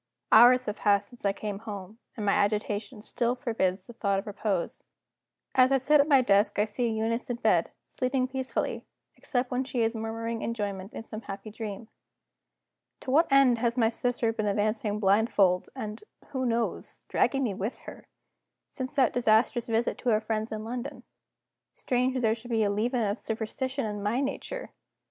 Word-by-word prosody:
Hours 250 Hz, +3 st, +7 dB
have 210 Hz, -, -3 dB
passed 200 Hz, -1 st, +2 dB
since 245 Hz, -4 st, -12 dB
I 200 Hz, -, +4 dB
came 200 Hz, 0 st, -5 dB
home 210 Hz, -1 st, -8 dB, 0.2 s
and 210 Hz, -, -3 dB
my 200 Hz, -, +3 dB
agitation 210 Hz, +1 st, -1 dB
still 240 Hz, +2 st, -1 dB
forbids 195 Hz, -6 st, -1 dB
the 240 Hz, -, -11 dB
thought 200 Hz, -4 st, 0 dB
of 195 Hz, -, -3 dB
repose. 200 Hz, -3 st, -2 dB, 0.7 s
As 255 Hz, 0 st, +5 dB
I 270 Hz, -, +5 dB
sit 290 Hz, +3 st, +4 dB
at 285 Hz, -, 0 dB
my 275 Hz, -4 st, +5 dB
desk 200 Hz, -1 st, +3 dB
I 210 Hz, -, +3 dB
see 230 Hz, +3 st, -1 dB
Eunice 225 Hz, +2 st, -1 dB
in 245 Hz, -, 0 dB
bed, 235 Hz, -, +2 dB, 0.2 s
sleeping 255 Hz, 0 st, -1 dB
peacefully, 260 Hz, 0 st, -3 dB, 0.3 s
except 250 Hz, -2 st, -2 dB
when 250 Hz, +1 st, 0 dB
she 255 Hz, -2 st, -2 dB
is 225 Hz, +1 st, +1 dB
murmuring 225 Hz, 0 st, -4 dB
enjoyment 200 Hz, -3 st, -3 dB
in -, -, -6 dB
some 220 Hz, -1 st, -7 dB
happy 200 Hz, 0 st, -8 dB
dream. 215 Hz, 0 st, -6 dB, 1.1 s
To 260 Hz, -, -4 dB
what 310 Hz, +2 st, +4 dB
end 270 Hz, -4 st, +5 dB
has 235 Hz, +1 st, 0 dB
my 225 Hz, -2 st, +4 dB
sister 230 Hz, -1 st, -1 dB
been 215 Hz, -2 st, -2 dB
advancing 210 Hz, +1 st, 0 dB
blindfold, 195 Hz, -2 st, +3 dB
and 215 Hz, -4 st, -6 dB, 0.3 s
(who 260 Hz, -3 st, -2 dB
knows?) 230 Hz, 0 st, -2 dB
dragging 275 Hz, -1 st, +1 dB
me 225 Hz, -6 st, 0 dB
with 200 Hz, +5 st, -4 dB
her, -, -, -10 dB, 0.6 s
since 260 Hz, +2 st, -6 dB
that 265 Hz, -4 st, +3 dB
disastrous 235 Hz, +1 st, +2 dB
visit 230 Hz, +1 st, 0 dB
to 250 Hz, -, -1 dB
our 215 Hz, -2 st, +4 dB
friends 220 Hz, 0 st, -3 dB
in 215 Hz, 0 st, -4 dB
London? 245 Hz, +4 st, -6 dB, 0.7 s
Strange 255 Hz, +1 st, 0 dB
that 255 Hz, -, 0 dB
there 220 Hz, -2 st, +3 dB
should 235 Hz, +2 st, -9 dB
be 225 Hz, -2 st, +2 dB
a 200 Hz, -, +1 dB
leaven 235 Hz, +4 st, 0 dB
of 205 Hz, +2 st, -1 dB
superstition 260 Hz, +4 st, -3 dB
in 210 Hz, -1 st, -4 dB
my 210 Hz, +5 st, 0 dB
nature! 285 Hz, -, -4 dB
225 Hz, 180 wpm, -28 LUFS, 210-250 Hz, 1.1 s, Hours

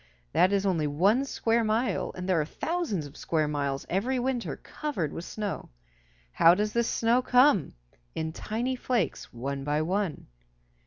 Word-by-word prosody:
That 185 Hz, -, +4 dB
is 200 Hz, 0 st, +1 dB
only 165 Hz, -6 st, +1 dB
one 195 Hz, -, +3 dB
square 230 Hz, -3 st, +1 dB
mile, 225 Hz, +3 st, 0 dB
and 180 Hz, 0 st, -5 dB
there 180 Hz, -4 st, +3 dB
are -, -, -2 dB
thousands 305 Hz, -, -2 dB
of 145 Hz, -, -12 dB
square 155 Hz, -2 st, 0 dB
miles 140 Hz, -2 st, -2 dB
every 235 Hz, +9 st, 0 dB
winter 250 Hz, -1 st, -2 dB
covered 200 Hz, -, -4 dB
with 165 Hz, -, -6 dB
snow. 210 Hz, -2 st, -4 dB, 0.6 s
How 165 Hz, -, +6 dB
does 210 Hz, +2 st, -1 dB
this 235 Hz, 0 st, +1 dB
snow 235 Hz, +2 st, +2 dB
come? 250 Hz, -, +4 dB, 0.4 s
In 160 Hz, 0 st, -3 dB
tiny 235 Hz, +8 st, -2 dB
flakes, 240 Hz, -, -1 dB
one 135 Hz, +3 st, -4 dB
by 150 Hz, +2 st, 0 dB
one. 190 Hz, 0 st, -2 dB
195 Hz, 160 wpm, -28 LUFS, 155-235 Hz, 0.6 s, How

